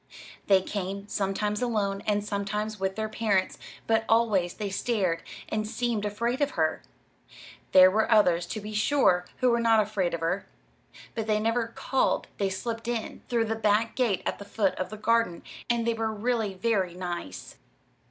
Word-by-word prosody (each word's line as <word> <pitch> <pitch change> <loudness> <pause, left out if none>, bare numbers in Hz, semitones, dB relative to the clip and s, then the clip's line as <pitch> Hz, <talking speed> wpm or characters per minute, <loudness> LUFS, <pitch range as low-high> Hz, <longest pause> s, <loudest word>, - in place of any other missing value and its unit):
They 190 -2 +5
came, 200 0 -4
sometimes 205 +1 -1
alone, 205 -5 0
and 205 -1 +1
sometimes 210 +1 -3
with 190 0 -1
their 220 0 -2
parents, 215 -4 0 0.3
but 225 0 +2
always 215 -6 +2
they 205 -2 -4
stared 190 -6 0 0.3
and 215 -1 -2
seemed 230 -2 -1
afraid 235 +6 -1
of 285 - +1
her. 160 -1 +1 0.9
There 185 0 +8
were 220 +2 +1
others, 175 -5 +4
to 215 - -4
be 210 +1 -7
sure, 210 -6 +3
who 250 -1 +4
were 235 - +2
not 230 -1 +4
afraid 200 -5 0
of 165 - -7
her. 180 +4 -1 0.7
But 225 -2 -3
they 215 -1 +2
never 225 +1 0
"called." 260 +3 0
They 200 -1 +1
"slipped 225 +4 -4
in" 235 -2 -3
through 235 -2 +2
the 225 - -1
back 220 +1 +1
gate 230 -8 +1
at - - -2
the - - -7
foot 200 -1 0
of 185 - -2
the 215 - -7
garden, 230 -4 +1 0.3
and 235 -1 +1
they 235 - +2
were 225 -1 -1
really 220 -2 -1
very 190 -3 0
nice. 175 - -6
210 Hz, 175 wpm, -27 LUFS, 190-225 Hz, 0.9 s, There